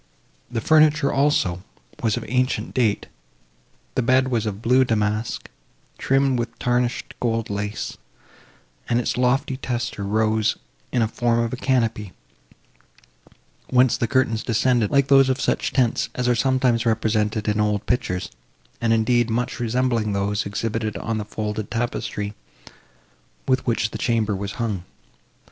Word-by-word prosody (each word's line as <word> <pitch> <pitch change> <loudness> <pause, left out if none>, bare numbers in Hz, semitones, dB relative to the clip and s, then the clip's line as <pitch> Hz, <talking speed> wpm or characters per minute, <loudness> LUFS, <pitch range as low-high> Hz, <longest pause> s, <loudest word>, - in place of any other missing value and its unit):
The 115 -2 -3
furniture, 155 0 +4
also, 135 -11 +1 0.4
was 110 -3 +1
of - - -5
ancient 125 +3 0
date; 115 -5 +1 0.9
the - - +1
bed 130 +2 +3
was 115 -3 0
of 100 -1 -4
blue 125 +3 +5
damask, 110 -1 -1 0.5
trimmed 135 -1 +2
with 120 - -4
tarnished 120 0 -1
gold 115 -3 -1
lace, 105 +1 -4 0.9
and 120 0 +2
its 120 - -1
lofty 130 +1 +1
tester 120 -5 -3
rose 110 +1 +1 0.4
in 120 - +1
the 110 - +3
form 120 +1 0
of 115 0 -2
a - - 0
canopy, 115 -7 0 1.6
whence 125 -1 +4
the 115 - -1
curtains 115 -2 +1
descended, 120 -2 +1
like 140 -1 +3
those 135 -1 +6
of 130 +1 0
such - - 0
tents 125 -4 +1
as 125 -1 -1
are 125 - +4
sometimes 125 -1 +2
represented 110 -1 0
in 105 0 +1
old 105 0 0
pictures, 90 -7 -1 0.5
and, 115 -1 +3
indeed, 120 +1 +2
much 120 +3 -2
resembling 120 -2 0
those, 100 +1 -1
exhibited 110 +1 -2
on 115 -1 -2
the 105 - -4
faded 105 0 -4
tapestry, 110 -3 -3 1.1
with 130 -1 +1
which 115 -2 +1
the - - -6
chamber 110 -4 +1
was 100 +1 -4
hung. 105 -7 -3
115 Hz, 145 wpm, -23 LUFS, 105-125 Hz, 1.6 s, those